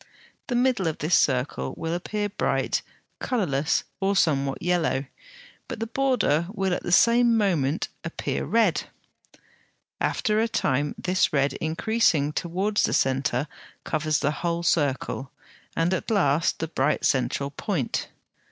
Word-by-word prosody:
The 245 - -1
middle 245 -7 +2
of 160 - -2
this 155 +4 -2
circle 130 -2 +1
will 165 0 -3
appear 205 +4 -2
bright, 205 - -1 0.4
colourless, 160 - 0 0.2
or 200 0 +1
somewhat 140 -6 +1
yellow, 165 -6 0 0.6
but - - -6
the 225 - -1
border 230 - +1
will 195 -3 0
at - - -2
the - - -4
same 235 +5 +5
moment 170 -8 +1 0.2
appear 165 - -3
red. 215 -8 +2 1.1
After 215 0 +1
a 225 - +2
time 145 - 0
this 185 0 +1
red, 140 -2 +1
increasing 160 -3 +1
towards 190 +6 0
the - - +1
centre, 135 +1 +1 0.4
covers 155 -1 0
the 145 - 0
whole 170 0 -1
circle, 140 -4 0 0.5
and 165 +3 +2
at 185 - -2
last 170 -7 +2
the 160 - -3
bright 150 -2 0
central 135 +2 0
point. 145 - -2
170 Hz, 135 wpm, -25 LUFS, 145-205 Hz, 1.1 s, same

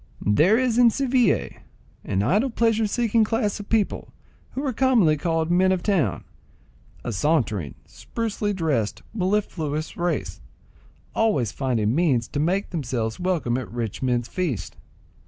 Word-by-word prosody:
There 155 - +4
is 250 -2 +1
in 240 -1 +7
Seville 255 0 +1 0.5
an 95 +1 -1
idle 210 - +2
pleasure 225 -2 +1
seeking 230 0 +2
class 215 -2 -1
of 205 - -9
people 220 -3 0 0.4
who 270 +3 -3
are 265 - -1
commonly 230 -11 +3
called 165 +1 -1
men 185 +2 +4
on 190 - +2
town, 175 - 0 0.8
a 120 - -3
sauntering, 110 - 0
sprucely 220 -2 -3
dressed, 150 - -1
mellifluous 180 -7 -1
race, 175 0 -2 0.7
always 175 - +1
finding 120 -5 0
means 135 -7 +2
to 145 - -3
make, 185 +6 0
themselves 120 -8 -3
welcome 170 -10 0
at 130 - -8
rich 115 -3 -4
men's 120 -2 0
feasts. 135 - -3
175 Hz, 135 wpm, -24 LUFS, -, 0.8 s, in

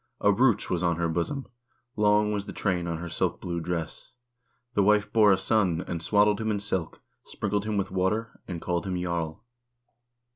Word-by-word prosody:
A 100 - +4
brooch 115 +1 +3
was 90 -2 -1
on 85 -1 +2
her 85 +1 0
bosom; 85 - -2 0.5
long 105 0 +3
was 100 -1 -2
the - - -7
train 90 -4 -1
on 85 -1 -2
her 85 +2 -6
silk - - -1
blue 85 -1 -3
dress. 85 -1 -4 0.6
The 105 - +3
wife 105 +1 +3
bore 105 -2 +6
a 95 - +4
son, 95 -3 +1
and 85 -2 -3
swaddled 105 +3 +3
him 110 - -1
in 105 -1 0
silk, 95 -5 -3 0.2
sprinkled 105 0 -2
him 110 -1 -1
with 100 -1 -1
water,2 105 +5 -1
and 85 -2 -4
called 85 +1 -1
him 90 -1 -2
jarl. 85 0 -3
95 Hz, 190 wpm, -27 LUFS, 85-105 Hz, 0.6 s, bore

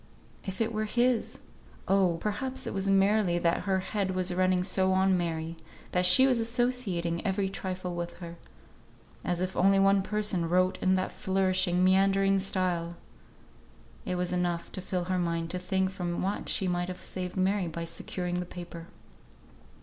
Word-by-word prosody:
If 190 +2 -5
it 225 0 0
were 215 0 -1
his! 240 +2 +1 0.5
Oh! 190 -3 +3
perhaps 260 +7 -3
it - - -4
was 195 0 -1
merely 195 -2 +3
that 170 -1 0
her 190 -1 +1
head 190 -1 -2
was 185 -1 0
running 185 0 +2
so 190 0 +2
on 190 0 +3
Mary, 165 -1 -2 0.3
that 180 0 +3
she 180 +9 +7
was 255 -3 +3
associating 225 -8 0
every 195 -1 0
trifle 185 -2 -4
with 175 0 -5
her. 170 -1 -9 0.9
As 175 -1 -1
if 185 0 -2
only 195 +2 +4
one 195 0 +4
person 200 -4 -1
wrote 185 +1 +2
in 185 0 +3
that 185 0 -1
flourishing, 185 -1 +1
meandering 195 +1 +3
style! 180 -3 -1 1.1
It 180 - -2
was 180 0 -1
enough 175 -1 -1
to 185 - -6
fill 180 -1 -2
her 185 +1 -1
mind 170 -1 -1
to 180 - -2
think 190 +1 0
from 175 -2 -3
what 195 +2 -2
she 190 - +2
might 175 0 -1
have 180 0 -7
saved 180 0 -5
Mary 190 0 +1
by 165 0 -5
securing 180 +1 -4
the 180 - -3
paper. 175 -2 -9
185 Hz, 170 wpm, -29 LUFS, 175-195 Hz, 1.1 s, she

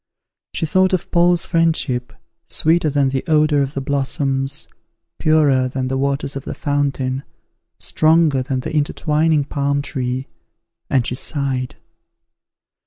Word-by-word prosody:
She - - 0
thought 185 +3 +2
of 185 - -1
Paul's 175 0 +3
friendship, 155 -7 0 0.4
sweeter 160 0 +2
than 140 -1 +2
the 130 0 -2
odour 155 -2 +3
of 140 +1 -2
the 135 - -2
blossoms, 135 0 -1 0.5
purer 145 -5 +3
than 130 0 -3
the 135 - -1
waters 140 0 -1
of 135 - -5
the - - -6
fountain, 140 -2 -1 0.5
stronger 155 -3 +3
than 130 0 -2
the 155 +4 -5
intertwining 150 +1 +1
palm 140 0 -1
tree, 130 -1 -3 0.6
and 130 -3 +2
she - - -2
sighed. 130 -1 -2
140 Hz, 130 wpm, -19 LUFS, 135-155 Hz, 0.6 s, Paul's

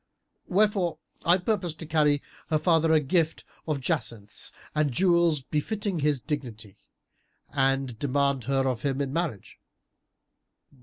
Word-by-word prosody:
Wherefore 195 -3 +2 0.3
I 175 +2 +5
purpose 180 -4 -1
to 160 - -8
carry 150 -2 +2 0.3
her 155 - +3
father 165 0 +3
a 160 - +6
gift 160 +2 0 0.2
of 150 -3 0
jacinths 110 -4 -2 0.2
and 150 -2 +1
jewels 170 0 +3
befitting 190 - -2
his 145 -2 +1
dignity, 120 -8 -6 0.7
and 135 -3 +1
demand 140 -2 +1
her 135 0 +1
of 125 -4 -1
him 135 -1 -1
in 140 -1 -2
marriage. 165 - -3
150 Hz, 125 wpm, -27 LUFS, 135-170 Hz, 0.7 s, a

